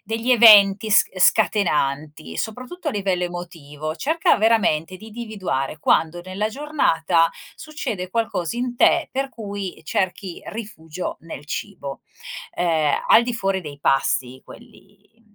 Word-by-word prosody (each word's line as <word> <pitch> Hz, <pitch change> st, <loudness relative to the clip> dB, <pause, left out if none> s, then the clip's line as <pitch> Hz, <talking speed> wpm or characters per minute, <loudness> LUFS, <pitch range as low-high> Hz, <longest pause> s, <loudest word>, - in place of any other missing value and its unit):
degli 225 Hz, +4 st, -2 dB
eventi 210 Hz, -3 st, +7 dB
s 205 Hz, -, +6 dB
scatenanti, 155 Hz, -8 st, +1 dB
soprattutto 255 Hz, +10 st, -6 dB
a -, -, +2 dB
livello 190 Hz, -3 st, -1 dB
emotivo. 160 Hz, -3 st, -7 dB
Cerca 320 Hz, -, +2 dB
veramente 190 Hz, -6 st, +2 dB
di 220 Hz, +3 st, -13 dB
individuare 200 Hz, -, -4 dB
quando, 165 Hz, +2 st, +1 dB
nella 190 Hz, +3 st, -3 dB
giornata, 180 Hz, -, +1 dB, 0.3 s
succede 230 Hz, -12 st, -5 dB
qualcosa 225 Hz, -4 st, -2 dB
in 245 Hz, -1 st, -3 dB
te, 335 Hz, +5 st, +3 dB
per 270 Hz, +1 st, -2 dB
cui 200 Hz, -5 st, -6 dB
cerchi 190 Hz, -2 st, -3 dB
rifugio 185 Hz, -7 st, -7 dB
nel 160 Hz, -3 st, -9 dB
cibo. 145 Hz, -7 st, -6 dB, 0.5 s
Ehm, 160 Hz, -4 st, +1 dB
al 235 Hz, -, +6 dB
di 245 Hz, -1 st, -3 dB
fuori 195 Hz, -3 st, -1 dB
dei 145 Hz, -3 st, -10 dB
pasti, 130 Hz, -2 st, 0 dB
quelli, 200 Hz, +2 st, -17 dB
mhmm, 215 Hz, -2 st, -30 dB
195 Hz, 130 wpm, -22 LUFS, 165-225 Hz, 0.5 s, eventi